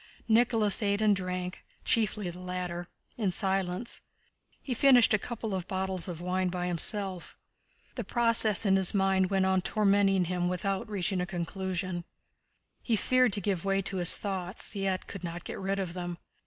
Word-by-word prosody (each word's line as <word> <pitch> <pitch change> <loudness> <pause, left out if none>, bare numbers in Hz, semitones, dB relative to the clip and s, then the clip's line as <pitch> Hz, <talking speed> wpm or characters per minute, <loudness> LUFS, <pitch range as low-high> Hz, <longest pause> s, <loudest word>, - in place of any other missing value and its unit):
Nicholas 225 -2 +3
ate 200 -1 +1
and 215 -2 +3
drank 180 -1 -4 0.2
(chiefly 210 -3 +1
the 175 - -11
latter) 180 -1 -5 0.3
in 210 -5 0
silence. 190 +2 -1 0.6
He 260 - -4
finished 250 -2 +5
a 215 - +3
couple 225 -1 -5
of 185 -2 -3
bottles 190 -1 -2
of 175 -3 -6
wine 180 +1 -1
by 180 0 -3
himself. 185 +1 +2 0.6
The - - -4
process 230 -3 +3
in 195 -1 +4
his 190 +1 +4
mind 190 -1 +2
went 195 -1 +1
on 190 0 +2
tormenting 195 -1 +2
him 175 0 -1
without 195 +3 -2
reaching 195 -2 -1
a 180 - -3
conclusion. 185 0 -3 0.8
He 230 - 0
feared 255 +1 +2
to 205 - +2
give 190 -3 -1
way 195 0 +1
to 190 - -3
his 175 -1 +5
thoughts, 190 +1 -3
yet 195 -2 -2
could 195 -2 -9
not 170 0 -6
get - - -7
rid 195 +1 -2
of 185 -3 -3
them. 175 -1 -5
190 Hz, 170 wpm, -29 LUFS, 180-205 Hz, 0.8 s, finished